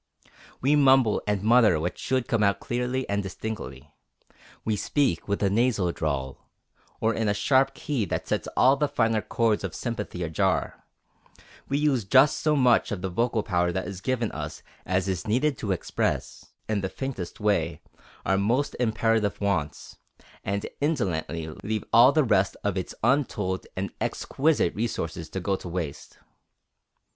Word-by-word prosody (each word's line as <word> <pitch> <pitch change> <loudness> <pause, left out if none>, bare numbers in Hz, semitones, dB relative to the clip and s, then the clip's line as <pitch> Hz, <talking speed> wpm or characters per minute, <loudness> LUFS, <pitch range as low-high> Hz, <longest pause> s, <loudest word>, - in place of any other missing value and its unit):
We 140 +4 +3
mumble 135 -6 +4
and 105 -2 0
mutter 110 -6 +5
what 85 +3 -2
should 130 -1 -1
come 115 - +1
out 100 -1 +2
clearly 125 +2 -2
and 100 0 0
distinctly; 75 -9 -7 0.7
we 110 - +1
speak 115 - 0
with 100 0 -1
a 100 - +3
nasal 110 -5 +2
drawl, 70 -5 -4 0.5
or 110 +1 +1
in 110 0 -1
a 105 - +1
sharp 135 +5 +2
key 135 -9 -2
that - - -3
sets - - -1
all 130 +2 +6
the 150 +1 +1
finer 115 -6 +1
chords 115 -2 0
of 95 -4 -4
sympathy 105 -6 -4
ajar; 80 -2 -1 0.8
we 140 - +1
use 145 -6 +2
just 130 +8 +4
so 155 -1 +2
much 125 -4 +3
of 95 -3 -4
the 95 - -2
vocal 115 +3 0
power 90 -3 +1
that 95 +2 -3
is 100 -2 -7
given 120 -3 -1
us 80 0 -6 0.2
as 95 +1 0
is 95 0 -2
needed 135 +7 +2
to 100 - -2
express 95 - -2 0.2
in 105 -2 0
the 95 - -2
faintest 125 -10 -5
way 85 -6 0 0.5
our 95 0 +2
most 120 +8 0
imperative 110 -2 +1
wants, 90 -8 -2 0.5
and 100 +1 -2
indolently 85 - -1
leave 110 +1 -2
all 120 +3 +8
the 155 +1 +3
rest 100 -6 +2
of 105 -2 0
its 95 -2 -4
untold 115 -8 0
and 95 +1 -2
exquisite 145 - +1
resources 85 -7 -3
to 95 - -4
go 95 +2 0
to 90 - -8
waste. 85 -5 -5
105 Hz, 160 wpm, -26 LUFS, 95-125 Hz, 0.8 s, all